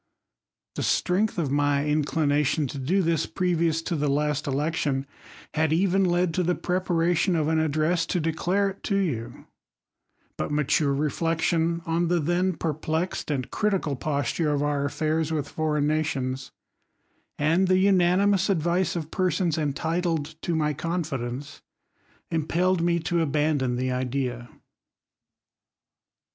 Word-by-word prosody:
The - - -4
strength 205 +4 +1
of 150 -6 -1
my 145 0 +2
inclination 150 0 +1
to 140 - -6
do 180 +9 +1
thi^* 165 -1 -1
previous 170 -3 +1
to 170 - -2
the 150 -1 0
last 145 0 0
election, 140 -1 -1 0.5
had 155 0 +1
even 190 +3 +3
led 175 -1 +1
to 185 - +1
the 180 0 +1
prepw 180 +1 -2
sration 175 +1 +2
of 150 - 0
an 160 0 +2
address 160 +2 +1
to 180 - 0
declare 175 +5 0
it 195 - -14
to 200 - 0
you; 150 - -2 0.9
but - - -1
matu^;e 145 -1 +1
reflection 165 +2 0
on 170 +1 0
the 175 +1 +2
then 175 +4 +1
perplexed 160 +2 -2
and 135 -4 -2
critical 195 -9 0
posture 150 +3 -1
of 145 -1 0
®ur 145 -1 0
a/fairs 155 +2 -1
with 150 -3 -1
foreign 150 -1 0
nations, 135 -4 -1 0.9
and 165 +6 +2
the 185 0 +4
unanimous 190 +1 +3
ad 175 -6 +1
vice 175 +2 +1
of 160 -2 -4
persons 180 -3 +1
entitled 160 +1 -1
to 170 - -1
my 150 -1 +1
confidence, 140 -5 -4 0.7
impelled 170 +3 +1
mt 170 -1 +1
to 170 -1 +1
abandon 145 -4 +1
the 130 +1 -1
idea. 125 -1 -2
160 Hz, 140 wpm, -26 LUFS, 145-175 Hz, 0.9 s, the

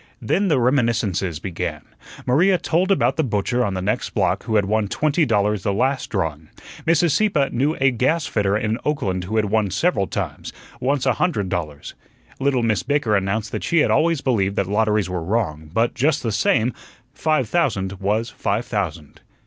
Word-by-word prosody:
Then 200 +1 0
the 150 -7 +2
reminiscences 115 - +1
began. 90 +2 -4 0.4
Maria 180 +9 +3
told 175 +3 0
about 195 - +2
the 160 - +2
butcher 120 +1 0
on 100 -4 -1
the 95 - -3
next 100 - -2
block - - 0
who 115 -2 -1
had 105 -2 +3
won 105 +1 0
twenty 155 - +1
dollars 105 -2 +1
the 100 - 0
last 130 +6 0
drawing. 80 -6 -3 0.4
Mrs. 165 0 +3
Sieppe 155 -7 +2
knew 140 +6 0
a 135 0 +4
gasfitter 120 -6 +1
in 110 +1 -1
Oakland 95 -12 -1
who 110 +4 -4
had 110 -1 +2
won 105 0 +1
several 100 - +1
times; - - -4 0.3
once 135 +1 0
a 130 - +3
hundred 110 - 0
dollars. 75 -5 -4 0.5
Little 135 -3 +1
Miss 110 -6 +1
Baker 140 -4 +1
announced 105 +2 -1
that - - -4
she 170 -2 +2
had - - +2
always 165 -3 +2
believed 100 -7 0
that 100 - +1
lotteries 105 0 +1
were 90 -2 -3
wrong; 80 -6 -2
but, 115 +6 +1
just 145 +3 +1
the 115 - -1
same, 115 +3 +1 0.4
five 155 -5 0
thousand 100 - -1
was 105 +4 -1
five 105 +5 -2
thousand. 85 -8 -4
110 Hz, 180 wpm, -21 LUFS, 100-140 Hz, 0.5 s, a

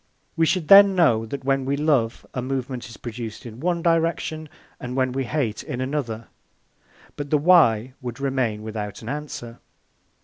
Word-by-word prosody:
We 165 0 +2
should 175 -2 0
then 200 +1 +8
know 115 -11 +3
that 140 +5 -6
when 135 0 +1
we 140 +2 -1
love, 140 -7 +1
a 125 - -2
movement 130 -2 -4
is 115 - -11
produced 115 -2 -7
in 115 0 -9
one 170 +2 -1
direction, 165 -2 0 0.3
and 125 0 -6
when 130 -1 +1
we 135 +1 -2
hate, 115 -6 -2
in 125 - -6
another. 130 -4 -3 0.9
But 145 -1 -6
the 150 - +3
Why 135 -8 +4
would 125 0 -6
remain 130 -6 -1
without 105 -1 -6
an 110 - -6
answer." 140 -5 -6
130 Hz, 170 wpm, -23 LUFS, 115-150 Hz, 0.9 s, then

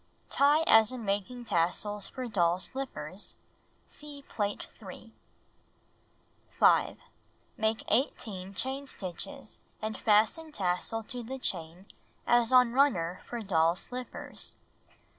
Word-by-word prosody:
Tie 290 +3 +5
as 225 -7 +6
in 250 -3 -6
making 205 +5 -2
tassels 195 +3 0
for 255 -1 -5
doll's 180 -5 +2
slippers. 270 0 -5 0.5
(See 290 -2 -6
Plate 205 -1 -2
3.) - - -11 1.4
5. - - +5 0.6
Make 220 0 0
18 200 -5 -1
chain 265 +7 -2
stitches, 215 - -6 0.2
and 215 0 -3
fasten 225 +10 +2
tassel 195 +1 -1
to 245 +2 -5
the 255 +3 -5
chain 175 -5 -2 0.4
as 240 -1 +4
on 250 -2 +6
runner 185 -11 +2
for 240 -1 -4
doll's 170 -2 +2
slippers. 250 0 -5
220 Hz, 110 wpm, -30 LUFS, 190-255 Hz, 1.4 s, as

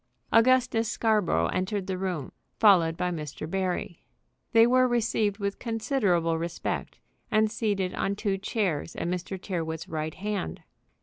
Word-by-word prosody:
Augustus 240 -1 +4
Scarborough 210 - +2
entered 190 +1 -1
the 190 -1 -2
room, 180 -6 -3 0.3
followed 175 -6 +5
by 180 - 0
Mr. 155 -2 -5
Barry. 180 -1 -2 0.5
They 225 -1 +7
were 255 +1 +4
received 225 -4 +1
with 200 -1 -3
considerable 205 - 0
respect, 170 +1 -4 0.3
and 215 0 +3
seated 205 -5 -1
on 200 - -1
two 200 -2 -1
chairs 190 -7 -2
at - - -3
Mr. 180 +2 -3
Tyrrwhit's 165 -4 -4
right 155 0 -4
hand. 200 - -4
195 Hz, 135 wpm, -27 LUFS, 170-220 Hz, 0.5 s, They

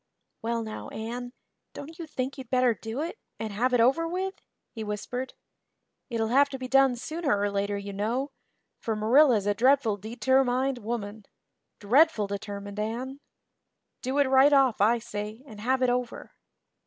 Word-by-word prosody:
"Well 230 0 -1
now, 215 -1 -7
Anne, 240 +3 -5 0.4
don't 320 +4 -9
you 335 - -6
think 265 -2 -3
you'd 260 -4 -9
better 250 -2 +3
do 225 +5 -5
it 335 +7 -5 0.2
and 220 -2 -5
have 245 +5 +1
it 245 - +3
over 270 +8 +3
with?" 375 +3 -2 0.4
he 225 - -6
whispered. 230 +5 -4 0.7
"It'll 225 -2 -1
have 280 +4 +4
to 270 - -5
be 255 -1 -6
done 270 -1 +4
sooner 295 -2 -1
or 205 0 0
later, 200 0 -1
you 200 0 -6
know, 235 +8 -2 0.5
for 225 - -2
Marilla's 225 0 +4
a 205 - +2
dreadful 250 -1 +3
deter 245 +6 +1
mined 255 +1 0
woman 215 -2 -5 0.5
dreadful 240 +1 +4
determined, 200 0 -6
Anne. 245 +6 -4 0.8
Do 260 +2 -2
it 285 - +5
right 265 +2 +5
off, 265 -7 +4
I 225 +4 +4
say, 220 0 -6
and 215 -6 -11
have 260 +3 +1
it 255 - +3
over." 245 -1 -3
245 Hz, 165 wpm, -27 LUFS, 215-270 Hz, 0.8 s, it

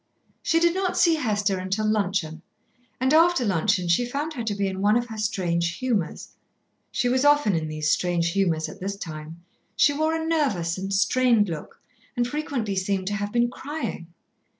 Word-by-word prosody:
She 330 - +2
did 340 0 +3
not 375 0 -1
see 340 -2 +5
Hester 210 -9 0
until 190 +4 -2
luncheon, 190 -6 -1 0.6
and 260 +3 +2
after 330 -4 +4
luncheon 185 -1 +1
she 170 +8 +3
found 285 +6 -3
her 245 -6 -4
to 215 -2 -2
be 200 0 -1
in 190 0 -4
one 210 +3 +4
of 240 - -1
her 220 - -7
strange 175 -5 -1
humours. 235 -9 -2 0.6
She 245 - 0
was 255 +2 +2
often 290 -8 +4
in 160 -2 -1
these 155 0 -1
strange 170 -1 +1
humours 170 -5 0
at 195 - -10
this 200 +1 -3
time. 160 -1 -8 0.3
She 290 - +4
wore 315 +2 0
a 320 0 -2
nervous 245 - 0
and 195 +1 -5
strained 220 +1 +3
look, 160 -3 -7 0.4
and 240 0 +1
frequently 255 -7 -3
seemed 190 0 -1
to - - -3
have 205 0 -3
been 240 +1 +1
crying. 285 - -5
205 Hz, 185 wpm, -25 LUFS, 180-260 Hz, 0.6 s, see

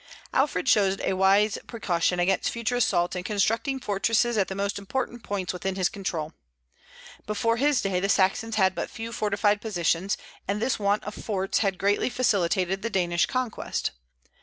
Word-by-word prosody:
Alfred 270 -1 +1
showed 195 -5 +3
a - - 0
wise 195 +3 +3
precaution 180 -6 0
against 180 +2 +2
future 235 +1 -2
assaults 175 -7 +1
in 180 - -3
constructing 225 +6 0
fortresses 230 +2 +1
at 195 -3 +2
the 190 - -5
most 200 +1 -2
important 240 +4 -3
points 195 -4 -3
within 190 +1 -3
his 185 -1 +1
control. 165 -5 -4 0.9
Before 230 +2 +1
his 280 0 +2
day 190 -2 0
the 195 +2 -1
Saxons 200 +4 +2
had 190 -3 +3
but - - -4
few 230 0 -6
fortified 205 -1 +1
positions, 185 -2 0 0.3
and 200 +1 -1
this 245 +2 0
want 205 0 +1
of 210 - -6
forts 195 -3 -1
had 195 -3 0
greatly 200 +6 +1
facilitated 195 -6 +1
the 230 - -2
Danish 175 -4 +1
conquest. 255 -3 -2
200 Hz, 165 wpm, -26 LUFS, 190-225 Hz, 0.9 s, showed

